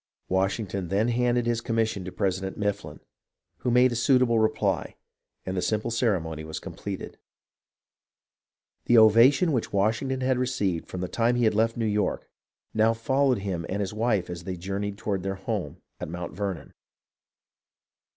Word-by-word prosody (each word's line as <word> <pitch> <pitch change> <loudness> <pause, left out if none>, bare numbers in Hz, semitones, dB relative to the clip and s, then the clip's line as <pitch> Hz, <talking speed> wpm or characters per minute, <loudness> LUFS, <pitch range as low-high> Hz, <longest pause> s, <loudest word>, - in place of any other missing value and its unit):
Washington 95 0 -1
then 105 +6 +1
handed 120 0 +1
his 120 -1 0
commission 115 -4 -1
to 90 - -6
President 95 0 -2
Mifflin, 105 -1 -3 0.6
who - - -2
made 125 +1 +5
a - - -2
suitable 120 -1 +3
reply, 110 0 0 0.5
and 95 - -3
the 90 - 0
simple 110 +4 -1
ceremony 90 -10 0
was 80 0 -6
completed. 100 -2 -7 1.7
The 120 - +5
ovation 115 - +6
which 125 -6 -1
Washington 115 +6 0
had 130 -1 +1
received 105 -10 -1
from 90 - -6
the 90 - -2
time 120 +5 +1
when 120 - +1
he 110 - +5
left 115 +2 +1
New 115 - 0
York 105 -1 -1 0.5
now 110 +1 +3
followed 130 +2 +2
him 90 -4 -2
and 100 - -2
his 100 0 -2
wife 110 -4 0
as 85 -1 -7
they 90 0 -5
journeyed 100 +3 -4
toward 100 -2 -2
their 95 +1 -3
home 95 - -4 0.2
at - - -5
Mount 85 +1 -6
Vernon. 100 -4 -4
105 Hz, 160 wpm, -26 LUFS, 95-120 Hz, 1.7 s, ovation